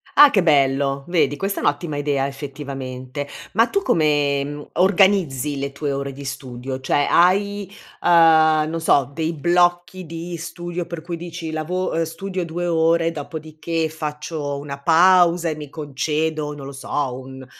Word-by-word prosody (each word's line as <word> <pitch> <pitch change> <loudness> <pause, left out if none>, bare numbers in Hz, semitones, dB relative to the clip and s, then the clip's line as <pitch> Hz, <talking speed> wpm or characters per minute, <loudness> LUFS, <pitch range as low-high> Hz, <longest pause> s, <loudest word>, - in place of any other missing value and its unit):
Ah, 290 -1 +9
che 195 - +3
bello! 140 -2 +2
Vedi, 165 -4 +2
questa 195 +3 -2
è - - -6
un'ottima 145 +1 -1
idea 145 -2 0
effettivamente. 135 -1 -6 0.2
Ma 225 +3 +4
tu 400 - 0
come, 145 - +2
mhmm, 145 +1 -7
organizzi 175 -7 +2
le 140 0 -3
tue 140 0 -3
ore 140 0 -3
di 140 +1 -10
studio? 130 0 -6
Cioè, 145 +2 +1
hai, 200 +2 +2 0.3
uhm, 160 -2 +5
non 165 0 -3
so 140 -4 +2
dei 160 0 -1
blocchi 175 +2 +1
di 170 +2 -6
studio 175 +1 -5
per 170 -2 -7
cui 170 0 -5
dici: 170 -1 -6
lavo 175 +4 -2
uhm, 165 - 0
studio 180 +3 -4
2 170 +1 -4
ore, 165 0 +2
dopodiché 160 +1 -4
faccio 150 -2 -4
una 140 -1 -7
pausa 175 +1 +4
e 155 - -4
mi 150 -2 -8
concedo, 150 +1 -2
non 140 -2 -9
lo 140 - -7
so, 135 -1 -3
un 130 0 -10
155 Hz, 160 wpm, -21 LUFS, 140-175 Hz, 0.3 s, Ah